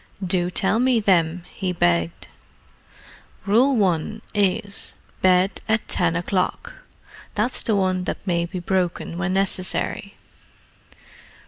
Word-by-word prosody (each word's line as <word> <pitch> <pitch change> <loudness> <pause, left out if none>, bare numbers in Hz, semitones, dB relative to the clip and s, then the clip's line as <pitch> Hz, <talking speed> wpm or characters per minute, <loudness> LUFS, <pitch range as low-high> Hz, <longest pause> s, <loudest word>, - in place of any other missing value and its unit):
"Do 180 -1 +1
tell 195 +4 +2
me 250 -1 +3
them," 175 -4 +2
he 190 -3 -2
begged. 85 - 0 1.2
"Rule 245 +6 +4
1 195 +2 0
is, 200 0 0 0.3
'Bed 185 +1 +3
at 220 0 +1
ten 165 -2 +1
o'clock.' 185 - -1 0.6
That's 225 +5 0
the 220 - +1
one 185 -2 0
that - - -4
may 170 -2 0
be 185 - -6
broken 175 -1 -2
when 190 0 -1
necessary. 195 +1 -1
185 Hz, 115 wpm, -23 LUFS, 175-205 Hz, 1.2 s, Rule